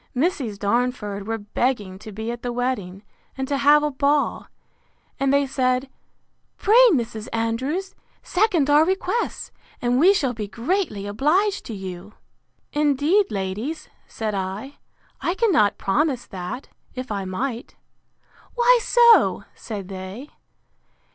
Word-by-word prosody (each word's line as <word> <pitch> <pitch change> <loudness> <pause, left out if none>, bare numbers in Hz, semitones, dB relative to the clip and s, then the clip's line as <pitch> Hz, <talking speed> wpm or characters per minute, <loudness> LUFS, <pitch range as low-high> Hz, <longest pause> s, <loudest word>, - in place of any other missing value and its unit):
Misses 260 - -1
Darnford 205 -2 -1
were 225 0 -1
begging 205 -2 -2
to 215 - -10
be 220 +3 -4
at 240 0 -7
the 245 - -3
wedding, 235 -6 -3 0.3
and 265 0 -2
to 280 - 0
have 295 +2 +5
a 300 - 0
ball: 285 +2 0 0.7
and 275 0 +2
they 280 0 +3
said, 260 0 0 0.7
Pray, 455 +5 +6
Mrs. 230 - -1
Andrews, 260 +12 -2 0.3
second 360 -7 +2
our 295 +1 +6
requests, 380 +6 -2 0.3
and 245 +1 +1
we 360 +6 +7
shall 275 -11 +1
be 215 -3 -5
greatly 230 - -2
obliged 310 - +1
to 225 - -5
you. 190 +1 -8 0.6
Indeed, 300 +7 +2
ladies, 210 +10 -4 0.2
said 220 -2 -4
I, 195 +8 -5 0.4
I 345 - 0
cannot 265 - +3
promise 260 +4 0
that, 185 +8 -7 0.3
if 255 -2 -6
I 200 -2 -2
might.—Why 275 - -2
so? 475 -1 +5
said 205 -5 -7
they. 190 +8 -8
250 Hz, 130 wpm, -23 LUFS, 210-300 Hz, 0.7 s, we